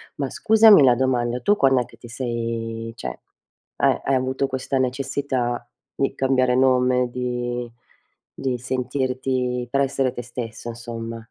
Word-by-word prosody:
Ma 140 -2 -2
scusami 220 -7 +6
la 125 -2 +6
domanda, 125 -1 0
tu 205 +10 +3
quand'è 135 - +3
che - - -18
ti 120 - -12
sei 115 -2 -4
cioè 60 - -6 0.6
hai - - +2
hai 135 - +2
avuto 130 +1 0
questa 130 0 -2
necessità 130 -2 -1 0.3
di 135 - 0
cambiare 130 -2 +2
nome, 125 -1 +3
di 120 -1 -3 0.6
di 130 -2 -2
sentirti 125 0 -2
per 140 - +2
essere 135 -1 0
te 120 - -5
stesso 120 -1 -6
insomma? 115 -1 -6
125 Hz, 140 wpm, -23 LUFS, 120-130 Hz, 0.6 s, scusami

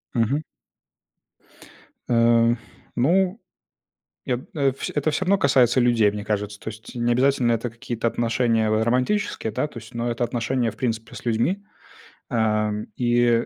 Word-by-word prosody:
Мгм. 125 +6 +1 1.7
Э, 115 0 +4 0.4
ну 180 - +2 0.9
я, 125 -2 0
э, 140 -3 +2
вс 135 - -5
это 150 +1 +1
всё 185 - -1
равно 200 +2 +3
касается 130 -5 +4
людей, 115 -4 +4
мне 105 0 -6
кажется. 105 -1 -3
То - - -6
есть 110 0 -12
не 120 0 +1
обязательно 130 -1 +3
это 115 +1 -1
какие-то 115 0 -4
отношения 115 -1 +1
в, 110 - +2
э, 110 - +2
романтические, 125 - 0
да, 150 - 0
то 125 - -10
есть, 110 0 -13
но 120 0 -1
это 120 +1 -1
отношения, 120 0 -1
в - - -15
принципе, 115 -2 -3
с - - -9
людьми. 120 - 0 0.7
Ам, 105 -2 0
и, 120 -1 +2
120 Hz, 155 wpm, -23 LUFS, 115-130 Hz, 1.7 s, Э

